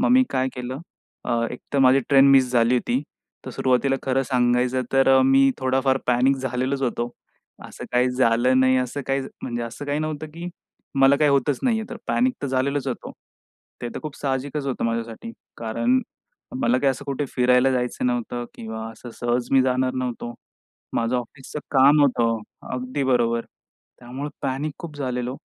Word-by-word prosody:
मग 250 Hz, -, +2 dB
मी 260 Hz, +1 st, +6 dB
काय 130 Hz, -1 st, 0 dB
केलं? 125 Hz, +2 st, -5 dB, 0.4 s
अ, -, -, -3 dB, 0.2 s
एकतर 140 Hz, -, -4 dB
माझी 135 Hz, 0 st, +5 dB
ट्रेन 140 Hz, -1 st, +6 dB
मिस 130 Hz, -2 st, +5 dB
झाली 120 Hz, 0 st, +3 dB
होती. 125 Hz, +1 st, 0 dB, 0.4 s
तर -, -, -6 dB
सुरुवातीला 130 Hz, +1 st, +1 dB
खरं 135 Hz, 0 st, +1 dB
सांगायचं, 125 Hz, 0 st, +1 dB
तर 135 Hz, 0 st, +5 dB
मी 135 Hz, +1 st, +5 dB
थोडाफार 130 Hz, 0 st, +1 dB
पॅनिक 125 Hz, +2 st, +3 dB
झालेलोच 130 Hz, +1 st, -2 dB
होतो. 120 Hz, -1 st, -1 dB, 0.6 s
असं -, -, -9 dB
काही 125 Hz, +1 st, +3 dB
झालं 125 Hz, +1 st, +3 dB
नाही 130 Hz, 0 st, +4 dB
असं 125 Hz, +3 st, -2 dB
काही 135 Hz, 0 st, +1 dB, 0.2 s
म्हणजे 120 Hz, -1 st, -3 dB
असं 115 Hz, +5 st, -6 dB
काही 145 Hz, +1 st, -1 dB
नव्हतं 155 Hz, 0 st, -3 dB
की 170 Hz, +1 st, -6 dB, 0.5 s
मला 135 Hz, +1 st, +6 dB
काही 150 Hz, 0 st, +3 dB
होतच 140 Hz, 0 st, +2 dB
नाही 235 Hz, -4 st, +2 dB
आहे 220 Hz, -, -7 dB
तर 240 Hz, -, -5 dB
पॅनिक 255 Hz, +1 st, +1 dB
तर -, -, 0 dB
झालेलंच 135 Hz, +1 st, -1 dB
होतो. 125 Hz, -, -5 dB, 0.7 s
ते 120 Hz, -, -2 dB
तर -, -, -5 dB
खूप 155 Hz, -2 st, -6 dB
साहजिकच 140 Hz, +1 st, -2 dB
होतं 135 Hz, -, -2 dB
माझ्यासाठी. 115 Hz, -, -3 dB, 0.3 s
कारण 115 Hz, +3 st, +1 dB, 0.6 s
मला 120 Hz, +2 st, +3 dB
काही 135 Hz, +1 st, +3 dB
असं 135 Hz, +1 st, -6 dB
कुठे 140 Hz, 0 st, -2 dB
फिरायला 125 Hz, +1 st, +4 dB
जायचं 125 Hz, 0 st, -1 dB
नव्हतं 120 Hz, 0 st, -2 dB
किंवा 110 Hz, 0 st, -6 dB
असं 120 Hz, +2 st, -11 dB
सहज 120 Hz, 0 st, 0 dB
मी 135 Hz, -1 st, +6 dB
जाणार 130 Hz, 0 st, +1 dB
नव्हतो. 125 Hz, -2 st, -4 dB, 0.6 s
माझं 115 Hz, +2 st, +1 dB
ऑफिसचं 130 Hz, +4 st, -6 dB
काम 140 Hz, +2 st, +6 dB
होतं. 115 Hz, -4 st, +2 dB, 0.3 s
अगदी 130 Hz, +2 st, -3 dB
बरोबर, 115 Hz, -3 st, +1 dB, 0.5 s
त्यामुळे 130 Hz, +4 st, -6 dB
पॅनिक 135 Hz, +3 st, -2 dB
खूप 160 Hz, -4 st, -8 dB
झालेलो. 125 Hz, -2 st, -3 dB
130 Hz, 170 wpm, -23 LUFS, 125-140 Hz, 0.7 s, मी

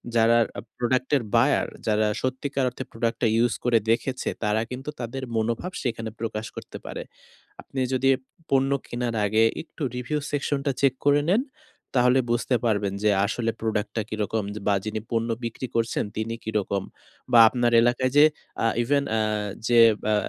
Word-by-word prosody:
যারা 115 Hz, 0 st, +5 dB, 0.2 s
আ -, -, -6 dB, 0.2 s
প্রোডাক্ট 125 Hz, +1 st, 0 dB
এর 130 Hz, -, -3 dB
বায়ার, -, -, +3 dB, 0.2 s
যারা 110 Hz, 0 st, +2 dB
সত্যিকার 130 Hz, +1 st, -1 dB
অর্থে 125 Hz, +1 st, -7 dB
প্রোডাক্ট 115 Hz, 0 st, -1 dB
টা 120 Hz, -, +4 dB
ইউজ 120 Hz, 0 st, +3 dB
করে 120 Hz, -1 st, +4 dB
দেখেছে 130 Hz, +3 st, -1 dB
তারা 105 Hz, 0 st, +1 dB
কিন্তু 130 Hz, +3 st, -5 dB
তাদের 125 Hz, +2 st, -5 dB
মনোভাব 115 Hz, +10 st, -1 dB
সেখানে 115 Hz, -3 st, -2 dB
প্রকাশ 110 Hz, -1 st, -3 dB
করতে -, -, -8 dB
পারে। -, -, -5 dB, 0.6 s
আপনি 135 Hz, -, -7 dB
যদি 130 Hz, +1 st, +1 dB
এব 130 Hz, -, -13 dB, 0.3 s
পণ্য 135 Hz, 0 st, +3 dB, 0.2 s
কেনার 120 Hz, -1 st, -3 dB
আগে 110 Hz, +2 st, +3 dB, 0.2 s
একটু 160 Hz, 0 st, -16 dB
রিভিউ 125 Hz, +5 st, -2 dB
সেকশনটা 145 Hz, -1 st, -1 dB
চেক 135 Hz, -2 st, +4 dB
করে 145 Hz, 0 st, +5 dB
নেন। 225 Hz, +7 st, +3 dB, 0.5 s
তাহলে 125 Hz, +1 st, +5 dB
বুঝতে 120 Hz, +2 st, +1 dB
পারবেন 100 Hz, -3 st, +1 dB
যে, 105 Hz, -, +4 dB, 0.2 s
আসলে 115 Hz, +2 st, -1 dB
প্রোডাক্টটা 110 Hz, 0 st, -1 dB
কি -, -, -3 dB
রকম? 110 Hz, +2 st, -1 dB
যে 105 Hz, -, -6 dB
বা 100 Hz, -, +4 dB
যিনি 110 Hz, 0 st, -2 dB
পণ্য 115 Hz, 0 st, 0 dB, 0.2 s
বিক্রি 115 Hz, +3 st, -4 dB
করছেন 115 Hz, 0 st, +1 dB
তিনি 110 Hz, +1 st, -2 dB
কি 110 Hz, -, -4 dB
রকম? 100 Hz, -1 st, -2 dB, 0.5 s
বা 120 Hz, -, +7 dB
আপনার 120 Hz, -1 st, +1 dB
এলাকায় 125 Hz, +2 st, +2 dB
যে, 150 Hz, -, +9 dB, 0.4 s
আ -, -, +5 dB, 0.2 s
ইভেন 140 Hz, +3 st, +2 dB
আ -, -, +2 dB, 0.5 s
যে, 120 Hz, -1 st, +5 dB, 0.3 s
আ -, -, +3 dB
120 Hz, 175 wpm, -25 LUFS, 110-130 Hz, 0.6 s, যে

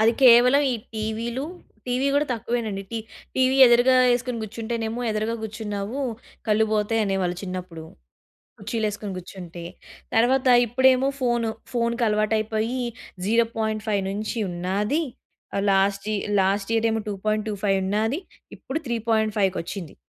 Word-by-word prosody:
అది 225 Hz, +1 st, +5 dB
కేవలం 250 Hz, +3 st, +7 dB
ఈ -, -, 0 dB, 0.2 s
టీవీలు 225 Hz, +3 st, -3 dB, 0.4 s
టీవీ 250 Hz, +2 st, 0 dB
గూడా 290 Hz, +1 st, +2 dB
తక్కువేనండి. 225 Hz, -4 st, -2 dB
టీ 230 Hz, -, -2 dB, 0.4 s
టీవీ 260 Hz, 0 st, +3 dB
ఎదురుగా 245 Hz, +2 st, +5 dB, 0.2 s
యేసుకొని 245 Hz, 0 st, 0 dB
గూర్చుంటేనేమో 225 Hz, +1 st, -4 dB
ఎదురుగా 215 Hz, +2 st, -1 dB
గూర్చున్నావు 215 Hz, +2 st, -4 dB, 0.5 s
కళ్ళుపోతాయి 215 Hz, +1 st, +2 dB
అనేవాళ్ళు 190 Hz, -3 st, -1 dB
చిన్నప్పుడు. 180 Hz, -4 st, -6 dB, 0.7 s
కుర్చీ‌లేసుకొని 210 Hz, -1 st, -3 dB
గూర్చుంటే. 175 Hz, -2 st, -9 dB, 0.5 s
తర్వాత 255 Hz, +3 st, +3 dB, 0.2 s
ఇప్పుడేమో 260 Hz, +3 st, +4 dB
ఫోను. 240 Hz, -2 st, +1 dB, 0.2 s
ఫోనుకి 235 Hz, 0 st, 0 dB
అలవాటు 215 Hz, +1 st, +1 dB
అయిపోయి 220 Hz, +3 st, -1 dB, 0.5 s
0.5 220 Hz, -2 st, 0 dB
నుంచి 215 Hz, +4 st, -3 dB
ఉన్నాది. 195 Hz, -, -1 dB, 0.7 s
లాస్ట్‌యి 195 Hz, +2 st, +1 dB, 0.2 s
లాస్ట్ 195 Hz, +2 st, 0 dB
ఇయర్ 225 Hz, 0 st, +2 dB
ఏమో 220 Hz, -1 st, -1 dB
2.25 205 Hz, -1 st, -1 dB
ఉన్నాది. 220 Hz, -, 0 dB, 0.4 s
ఇప్పుడు 275 Hz, -, -4 dB
త్రీ 235 Hz, -1 st, -1 dB
పాయింట్ 220 Hz, -1 st, +2 dB
ఫైవ్‌కొచ్చింది. 190 Hz, -3 st, -2 dB
220 Hz, 115 wpm, -24 LUFS, 205-235 Hz, 0.7 s, కేవలం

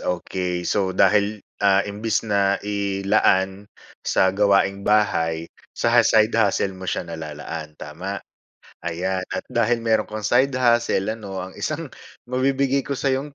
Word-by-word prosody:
okay. 90 Hz, 0 st, -3 dB
So 95 Hz, -2 st, 0 dB
dahil, 105 Hz, 0 st, +3 dB, 0.2 s
ah, 100 Hz, -1 st, +4 dB
imbis 110 Hz, +2 st, -2 dB
na 100 Hz, -2 st, +2 dB
ilaan 100 Hz, -1 st, +1 dB, 0.3 s
sa 95 Hz, 0 st, +2 dB
gawaing-bahay, 100 Hz, -4 st, +2 dB, 0.3 s
sa -, -, +4 dB
side 110 Hz, 0 st, +4 dB
hustle 100 Hz, -3 st, +1 dB
mo 95 Hz, 0 st, -8 dB
siya -, -, -2 dB
nalalaan, 80 Hz, -1 st, -7 dB
tama? 90 Hz, +7 st, -6 dB, 0.6 s
Ayan 95 Hz, +2 st, -2 dB
at 95 Hz, -, -2 dB
dahil 120 Hz, 0 st, +1 dB
mayro'n 110 Hz, -2 st, +1 dB
kang 110 Hz, 0 st, -6 dB
side 130 Hz, +4 st, +3 dB
hustle 120 Hz, -5 st, +2 dB
ano, 100 Hz, -4 st, -6 dB
ang -, -, -17 dB
isang 155 Hz, 0 st, -3 dB, 0.4 s
mabibigay 135 Hz, +2 st, +1 dB
ko 140 Hz, -, -2 dB
sa'yong 140 Hz, +2 st, -1 dB
100 Hz, 130 wpm, -22 LUFS, 95-115 Hz, 0.6 s, ah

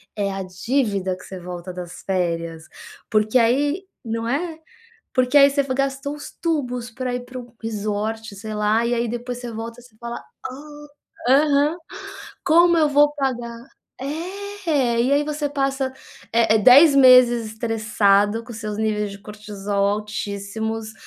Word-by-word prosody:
é 200 Hz, -2 st, -1 dB
a 195 Hz, 0 st, -4 dB
dívida 195 Hz, -1 st, -1 dB
que -, -, -14 dB
você 190 Hz, -, -8 dB
volta 180 Hz, 0 st, -7 dB
das 180 Hz, -1 st, -8 dB
férias, 170 Hz, -3 st, -2 dB, 0.5 s
porque 215 Hz, +3 st, +2 dB
aí 285 Hz, +10 st, +2 dB, 0.2 s
não 230 Hz, 0 st, -3 dB
é? 315 Hz, +5 st, -2 dB, 0.6 s
Porque 255 Hz, +2 st, +2 dB
aí 280 Hz, 0 st, +8 dB
você 280 Hz, 0 st, +1 dB
gastou 275 Hz, +1 st, -2 dB
os 295 Hz, -, -9 dB
tubos 250 Hz, -8 st, -2 dB
para 250 Hz, +2 st, -4 dB
ir 245 Hz, -, -2 dB
para 255 Hz, +1 st, -8 dB
um 245 Hz, -, -7 dB
para 240 Hz, -, -23 dB
um 230 Hz, -, -37 dB
resort 215 Hz, 0 st, -3 dB
sei 215 Hz, +2 st, -6 dB
lá, 210 Hz, +2 st, +2 dB
e 240 Hz, -, +1 dB
aí 235 Hz, 0 st, -1 dB
depois 240 Hz, +1 st, -4 dB
você 245 Hz, -1 st, -6 dB
volta 230 Hz, +2 st, -7 dB
e -, -, -17 dB
você 220 Hz, -3 st, -20 dB
fala: 235 Hz, 0 st, -6 dB, 0.3 s
"Ah, 295 Hz, +3 st, -9 dB, 0.5 s
aham, 295 Hz, +2 st, +3 dB, 0.7 s
como 340 Hz, +1 st, +5 dB
eu 305 Hz, -, +4 dB
vou 290 Hz, +1 st, +4 dB
pagar?" 240 Hz, -5 st, -3 dB, 0.4 s
É, 325 Hz, -4 st, -2 dB
e 260 Hz, +3 st, +1 dB
aí 290 Hz, +1 st, +3 dB
você 295 Hz, -1 st, -2 dB
passa, 270 Hz, -1 st, -1 dB, 0.4 s
é 230 Hz, -1 st, +4 dB
é -, -, +5 dB
10 275 Hz, +7 st, +8 dB
meses 250 Hz, -3 st, +7 dB
estressado 215 Hz, -1 st, +1 dB
com 240 Hz, -, -9 dB
seus 215 Hz, -2 st, -5 dB
níveis 210 Hz, -2 st, -1 dB
de 200 Hz, -, -9 dB
cortisol 205 Hz, -1 st, -3 dB
altíssimos, 210 Hz, +1 st, -4 dB
235 Hz, 160 wpm, -22 LUFS, 210-275 Hz, 0.7 s, aí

